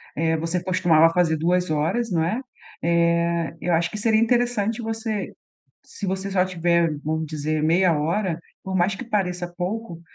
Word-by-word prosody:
Eh, 160 +1 +1
você 165 +2 -2
costumava 175 -3 +4
fazer 165 -3 +2
2 180 +2 +1
horas, 160 +10 0
não 165 -3 +2
é? 215 +10 -1 0.4
Eh, 170 0 +1
eu 175 - 0
acho 165 +1 +1
que - - -5
seria 220 +1 +2
interessante 230 -1 +1
você 220 -2 -3 0.5
se 205 - -7
você 190 +1 -2
só 190 -2 +2
tiver, 170 -2 +1
vamos 160 +2 -2
dizer 155 0 -2
meia 170 +1 +3
hora, 165 +3 0 0.2
por 190 0 -4
mais 185 +3 +2
que - - -7
pareça 180 -5 -1
pouco, 185 -1 -4
175 Hz, 165 wpm, -23 LUFS, 165-200 Hz, 0.5 s, costumava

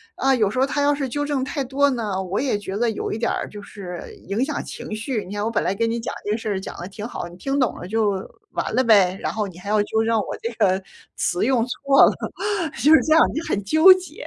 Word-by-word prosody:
啊， 270 0 +2
有 215 -6 +2
时 215 - -6
候 265 - +4
他 285 +1 -1
要 290 0 +3
是 280 -2 -2
纠 290 +4 -2
正 285 -3 -1
太 280 +2 -3
多 275 +2 +2
呢， 210 -6 -2
我 190 +2 -2
也 260 -6 0
觉 195 -1 -6
得 235 +1 +1
有 220 - -3
一 - - -2
点 235 - 0
儿 - - -3
就 210 - -9
是 185 -4 -8 0.3
影 215 +6 0
响 - - -3
情 215 - -7
绪。 220 0 -3
你 195 - -7
看 205 - -2
我 225 - -1
本 230 - +1
来 190 - 0
跟 230 +3 0
你 235 - -2
讲 - - -4
这 205 - -1
个 215 - +1
事 225 - -7
儿 195 -2 -1
讲 - - -7
得 175 - -6
挺 205 +2 -8
好， 205 - -5
你 175 - -12
听 275 +6 -1
懂 250 - +1
了 - - -7
就 220 0 +1 0.4
完 - - -3
了 255 - +4
呗， 195 -6 +4
然 - - -1
后 215 -1 -1
你 175 - -13
还 195 - -11
要 210 0 +3
纠 220 +1 0
正 230 0 +2
我 - - -3
这 230 - -2
个 195 -3 +2 0.4
词 175 +2 0
用 250 -2 +2
错 275 +2 +4
了， - - +3 0.7
就 300 - +6
是 - - +8
这 315 - +2
样， 320 - +7
你 - - 0
很 205 -11 -2
纠 315 - +8
结。 370 0 -8
225 Hz, 305 characters per minute, -22 LUFS, 205-270 Hz, 0.7 s, 是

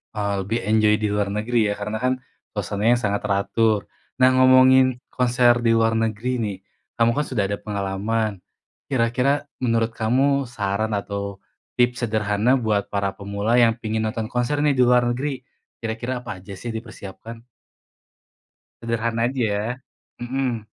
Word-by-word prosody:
Oh, 100 -2 -1
lebih 110 +5 -1
enjoy 110 0 +4
di 105 - 0
luar 100 -1 -1
negeri 110 0 +1
ya, - - 0
karena 105 +1 -4
kan, 130 0 +3 0.4
konsernya 105 +4 +1
sangat 100 -3 -1
teratur. 105 +1 +1 0.3
Nah, 130 0 +6
ngomongin 130 0 +5
konser 120 -1 +2
di 115 - +3
luar 115 0 +3
negeri 115 +3 -1
nih, 105 -6 -2 0.4
kamu 115 0 +4
kan 150 - +1
sudah 105 -6 0
ada 100 - -2
pengalaman, 100 0 -2 0.5
kira-kira 130 +4 +1 0.2
menurut 115 -1 +1
kamu 135 +5 +2
saran 105 +1 -1
atau, 100 0 -5 0.4
tips 120 0 +2
sederhana 110 +3 +1
buat 105 -3 -1
para 100 -1 -1
pemula 100 +3 -1
yang 120 -2 +5
pingin 110 -1 -2
nonton 110 0 -2
konser 125 +5 -1
nih, 145 -2 +2
di 125 - +4
luar 125 0 +4
negeri, 135 +1 -3 0.4
kira-kira 120 +3 -3
apa 95 -6 -8
aja 100 - -9
sih 115 0 -5
dipersiapkan? 110 0 -9 1.4
Sederhana 115 0 -1
aja, 130 -1 -3
ya. 105 -1 0 0.5
Mhm. 120 -2 -2
115 Hz, 145 wpm, -22 LUFS, 105-125 Hz, 1.4 s, Nah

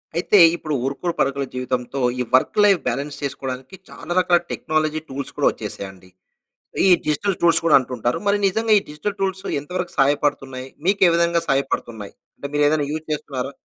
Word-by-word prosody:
అయితే, 180 +4 +3 0.2
ఇప్పుడు 155 -3 -5
ఉరుకుడు 140 +6 -2
పరుకుల 140 0 0
జీవితంతో 125 +1 -3 0.2
ఈ - - +1
వర్క్ 130 - +2
లైఫ్ 200 -3 +5
బ్యాలన్స్ 140 +4 -3
చేసుకోవడానికి 130 +2 -5
చాలా - - -10
రకాల 180 -1 +3
టెక్నాలజీ 155 0 -1
టూల్స్ 135 +1 -5
కూడా - - +3
వచ్చేసాయండి. 95 -1 -8 0.8
ఈ - - +5 0.2
డిజిటల్ 170 +6 0
టూల్స్ 170 -1 +5
కూడా 160 - +6
అంటుంటారు. 125 -2 -2
మరి 200 0 +3
నిజంగా 220 +3 +1
ఈ - - -12
డిజిటల్ 190 +7 -4
టూల్స్ 190 0 -1 0.2
ఎంత 145 - -13
వరకు 180 -1 -4
సహాయపడుతున్నాయి. 135 -2 0 0.2
మీకు 200 +1 +2
ఏ - - +2
విధంగా 170 0 +2
సహాయపడుతున్నాయి? 120 -6 -2 0.2
అంటే 140 - -6
మీరు 145 0 +3
ఏదైనా 150 -2 0
యూజ్ 155 +1 -4
చేస్తున్నారా? 135 -3 -4
145 Hz, 165 wpm, -21 LUFS, 130-170 Hz, 0.8 s, కూడా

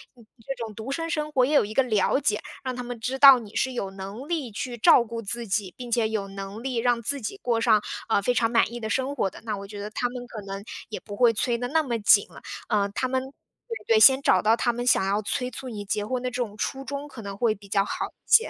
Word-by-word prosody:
嗯， 235 -2 -18 0.2
这 270 - -3
种 220 -2 -7
独 225 +5 -6
身 330 +4 -3
生 305 -2 -2
活 255 -4 +3
也 290 - -1
有 - - +6
一 210 +1 -6
个 270 - +4
了 220 0 +2
解， 210 -7 0 0.2
让 255 -1 -3
他 250 - -5
们 245 -1 -6
知 255 +4 -3
道 270 -2 +9
你 215 -3 -12
是 260 - +1
有 200 -6 -4
能 195 +7 -8
力 310 -8 -2
去 240 +3 -5
照 235 +2 +6
顾 230 0 -5
自 235 +2 -4
己， 195 -2 -1
并 245 -1 -7
且 230 -2 +1
有 215 -3 -2
能 195 +2 -7
力 260 -2 -3
让 240 0 +1
自 275 +4 -2
己 315 - -5
过 235 - -1
上， 220 -3 +4 0.3
呃， 210 - +3
非 245 +5 +1
常 230 -1 +1
满 235 -1 +2
意 240 - -5
的 220 - -3
生 265 +5 -1
活 200 - 0
的， - - -13
那 220 - -2
我 200 - -7
觉 205 +1 -9
得 205 +1 -5
他 245 +3 -2
们 245 0 -7
可 225 -4 -8
能 195 0 -6 0.3
也 215 - -5
不 205 - -9
会 240 +1 +5
催 235 +2 0
得 245 +1 -4
那 320 +3 +3
么 245 -6 -2
紧 205 -1 +5
了， - - -13 0.5
他 255 - -1
们 260 0 -1 0.6
对 460 - +4
对， 435 - +6
先 265 -7 +8
找 185 -8 +4
到 220 +3 +4
他 240 -1 +1
们 245 +1 -4
想 220 -5 +4
要 200 +2 +1
催 250 +4 -2
促 255 +2 -8
你 210 -3 -6
结 205 +1 -1
婚 250 +3 -2
的 250 - -2
这 250 - -9
种 235 -5 -3
初 270 +5 -3
衷， 280 +2 -5
可 255 -5 -10
能 200 -1 -7
会 225 -2 +2
比 200 -1 -16
较 195 0 +2
好 - - -3
一 - - -23
些。 455 - +6
235 Hz, 300 characters per minute, -25 LUFS, 210-260 Hz, 0.6 s, 道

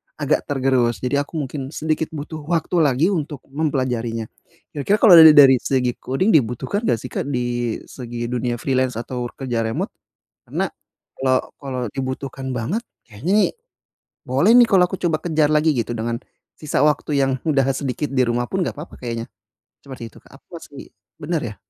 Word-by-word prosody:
agak - - 0
tergerus 130 -4 +1
jadi 140 +3 0
aku - - -13
mungkin 135 -2 -4
sedikit 155 0 -1
butuh 155 +2 -6
waktu 170 0 0
lagi 145 +2 +3
untuk 150 -6 -3
mempelajarinya, 130 -6 -1 0.5
kira-kira 175 +9 +1
kalau 180 -6 +10
dali 160 -1 +10
dari 135 -3 +8
segi 125 -2 0
coding 185 +12 0
dibutuhkan 130 - +1
enggak 115 - +2
sih, 125 - -7
Kak, - - -3
di 120 -3 -2
segi 120 -2 -6
dunia 120 -1 -1
freelance 130 0 0
atau 120 +1 -4
kerja 125 -4 -3
remote? 110 - -3 0.6
Karena - - -1 0.5
kalau 130 -1 +3 0.2
kalau 130 -2 -4
dibutuhkan 130 0 -4
banget 150 - -2 0.2
kayaknya 120 - -3
nih, - - -6 0.8
boleh 140 - +4
nih 240 -2 +7
kalau 185 -2 +5
aku 190 - -4
coba 165 -3 +1
kejar 155 -3 +2
lagi 155 +1 +3
gitu 120 0 -1
dengan, 115 +1 -2 0.4
sisa 150 -3 -1
waktu 150 -1 +1
yang 135 0 +2 0.2
udah 135 -3 +3
sedikit 140 +1 -3
di 130 -1 +3
rumah 120 +1 0
pun 190 - -1
gak - - -4
papa 150 - -9
kayaknya, 115 -2 -4 0.6
seperti 125 -4 -8
itu, - - -18
Kak, 135 - -16
apa - - -61
masih 145 -4 -11 0.3
benar 160 +1 -2
ya? 105 -3 -5
135 Hz, 170 wpm, -21 LUFS, 125-155 Hz, 0.8 s, kalau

